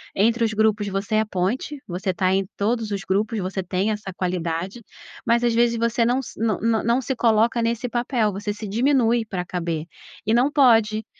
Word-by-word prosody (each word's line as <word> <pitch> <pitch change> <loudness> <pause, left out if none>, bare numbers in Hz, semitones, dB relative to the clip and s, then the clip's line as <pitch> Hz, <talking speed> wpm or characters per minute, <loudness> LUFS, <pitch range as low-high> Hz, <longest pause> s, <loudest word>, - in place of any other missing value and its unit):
entre 230 +4 +2
os 220 -1 +1
grupos, 215 -1 +1
você 195 +2 -2
é - - +4
a - - -1
ponte, 215 +9 -2
você 185 +2 -2
tá 185 0 +1
em 195 0 +1
todos 220 +1 0
os 200 - -2
grupos, 210 +4 0
você 190 +1 -3
tem 190 +4 -1
essa 210 -2 -5
qualidade, 180 +4 -3 0.4
mas 235 0 +2
às 235 -1 +2
vezes 235 0 +3
você 230 0 +1
não 250 +3 +1
se - - -11
não 220 -3 0
não 225 -1 +1
não 235 +3 +2
se 265 +1 -3
coloca 230 0 +2
nesse 235 +2 -1
papel, 240 -2 0
você 205 +2 -3
se 210 0 -7
diminui 235 +1 +2
pra 180 -4 -4
caber, 170 -3 -3 0.4
e 220 - +1
não 250 +5 +3
pode, 225 -6 +4
220 Hz, 205 wpm, -23 LUFS, 195-235 Hz, 0.4 s, é